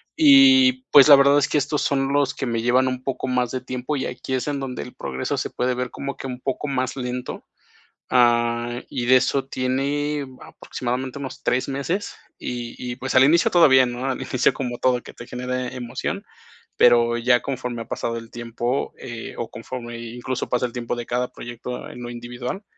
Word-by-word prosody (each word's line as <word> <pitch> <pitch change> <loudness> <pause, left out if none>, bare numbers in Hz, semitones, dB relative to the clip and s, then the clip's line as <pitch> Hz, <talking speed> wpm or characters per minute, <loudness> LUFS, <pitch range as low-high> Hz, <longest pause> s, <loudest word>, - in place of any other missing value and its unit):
Y, 265 -4 +6
pues, 140 -1 +9
la 145 - +11
verdad 140 +1 +5
es 140 - +1
que - - +1
estos 145 +1 0
son 135 -1 0
los 140 -1 +2
que 135 - -3
me 115 -2 -1
llevan 125 +2 +3
un 130 0 -3
poco 130 -1 -3
más 125 -1 0
de 130 - -2
tiempo, 125 +3 -4
y 135 - -2
aquí 125 +1 -5
es 130 - -1
en 145 -1 -1
donde 130 -2 -5
el 125 - -11
progreso 65 -1 -3
se - - -2
puede 125 +1 -1
ver 125 0 -3
como 140 0 -5
que 135 - -6
un 125 -1 -6
poco 135 +2 -3
más 130 -2 -1
lento, 125 -1 -5 0.7
ah, 120 0 +2
y 120 -1 -3
de 130 - +7
eso 135 +1 +1
tiene 140 +3 -1 0.2
aproximadamente 130 +2 -5
unos 135 -2 -7
3 125 +1 +1
meses, 140 +9 -2 0.2
y 120 -1 -5
y 125 -1 -5
pues 130 +1 -4
al 130 +1 +7
inicio 165 +5 +4
todo 170 -4 +6
bien, 130 -2 +5
¿no? 120 +1 -5
Al 130 - -3
inicio, 130 -1 +1
como 120 -2 -4
todo 125 -1 +2
que - - -12
te 120 - -10
genere 125 +1 -4
emoción, 125 0 -4 0.5
pero 120 -1 +5
ya 120 +1 +3
conforme 125 -3 -4
ha - - -8
pasado 115 0 -3
el 115 0 -10
tiempo, 120 +2 -3
eh, 120 -2 -7
o 120 - -4
conforme 120 0 -7
incluso 120 +2 -4
pasa 125 0 +1
el 120 - -11
tiempo 120 -1 -3
de 120 -1 -5
cada 125 +1 -1
proyecto 120 +1 -7
en 125 - -10
lo 120 - -6
individual, 120 - -6
125 Hz, 205 wpm, -23 LUFS, 120-135 Hz, 0.7 s, la